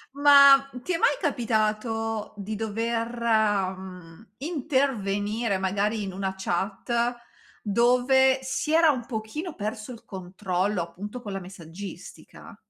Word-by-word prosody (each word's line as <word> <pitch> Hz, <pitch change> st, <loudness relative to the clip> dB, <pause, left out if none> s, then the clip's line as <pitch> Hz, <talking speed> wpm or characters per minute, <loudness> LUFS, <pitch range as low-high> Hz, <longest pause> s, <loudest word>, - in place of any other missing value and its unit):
Ma 280 Hz, -1 st, +7 dB
ti 365 Hz, -, -3 dB
è -, -, +1 dB
mai 470 Hz, +7 st, +3 dB
capitato 225 Hz, -1 st, -1 dB
di 205 Hz, +1 st, -5 dB
dover, 230 Hz, +2 st, -2 dB
mhmm, 190 Hz, -4 st, -1 dB
intervenire 235 Hz, -, -1 dB
magari 200 Hz, +3 st, -1 dB
in 195 Hz, -, -4 dB
una 190 Hz, 0 st, -3 dB
chat 190 Hz, +5 st, -3 dB, 0.7 s
dove 250 Hz, +4 st, +3 dB
si 295 Hz, +4 st, -2 dB
era 325 Hz, -1 st, +6 dB
un 250 Hz, -4 st, -4 dB
pochino 260 Hz, +9 st, -5 dB
perso 215 Hz, +3 st, -5 dB
il 235 Hz, 0 st, -13 dB
controllo, 185 Hz, 0 st, -2 dB
appunto, 200 Hz, +8 st, -7 dB
con 210 Hz, -4 st, -7 dB
la 195 Hz, -, -3 dB
messaggistica? 180 Hz, 0 st, -11 dB
220 Hz, 120 wpm, -26 LUFS, 195-250 Hz, 0.7 s, Ma